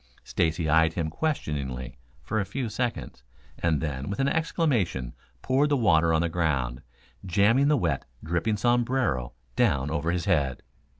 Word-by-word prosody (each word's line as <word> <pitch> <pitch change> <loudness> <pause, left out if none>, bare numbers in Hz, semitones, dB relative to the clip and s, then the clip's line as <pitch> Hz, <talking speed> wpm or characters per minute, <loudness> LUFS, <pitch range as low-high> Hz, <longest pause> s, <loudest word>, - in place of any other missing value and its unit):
Stacy 80 0 0
eyed 80 +2 +4
him 80 -2 -2
questioningly 70 - -3 0.3
for 110 - -1
a - - +1
few 115 +5 -4
seconds, 120 - -3 0.4
and 80 -3 +1
then 70 -3 -3
with 100 - -4
an 135 - +2
exclamation 135 - 0 0.3
poured 140 +3 +2
the 145 - +3
water 85 -8 +4
on 80 0 +3
the - - +1
ground, 70 -8 -1 0.4
jamming 105 +9 +3
the 150 0 +4
wet, - - -1 0.2
dripping 90 +7 0
sombrero 120 - +1 0.2
down 70 +2 +2
over 80 +1 -1
his 90 0 -2
head. 70 -10 +1
85 Hz, 155 wpm, -27 LUFS, 75-120 Hz, 0.4 s, eyed